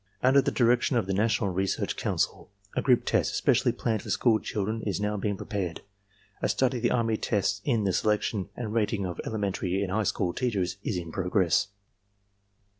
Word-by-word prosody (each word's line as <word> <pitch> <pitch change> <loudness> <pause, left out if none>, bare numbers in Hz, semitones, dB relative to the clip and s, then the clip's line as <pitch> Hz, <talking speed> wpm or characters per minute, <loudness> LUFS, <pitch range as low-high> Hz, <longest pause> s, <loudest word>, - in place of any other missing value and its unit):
Under 135 +2 +6
the - - 0
direction 120 +1 +2
of 115 - +1
the 95 - -2
National 105 -1 +1
Research 95 +2 -1
Council, - - -2 0.3
a - - +1
group 125 -3 +3
test - - +1
especially 125 0 +3
planned 110 -3 -1
for 110 - -9
school 110 +2 +3
children 110 +2 -3
is 100 -3 -2
now 105 0 -1
being 100 0 -2
prepared. 95 -7 -4 0.6
A - - +1
study 130 -1 +1
of - - -5
the 120 - +2
army 115 -2 +1
tests 100 -2 0
in 115 -6 +1
the 95 -2 +1
selection 105 -1 0
and 110 -3 -4
rating 105 -3 0
of 90 -1 -4
ele - - -5
mentary 95 -1 -1
and 95 - -3
high 110 +3 +1
school 90 -4 0
teachers 95 -8 -1
is 100 - -1
in 85 -2 -5
progress. 90 +1 +1
105 Hz, 190 wpm, -28 LUFS, 95-115 Hz, 0.6 s, Under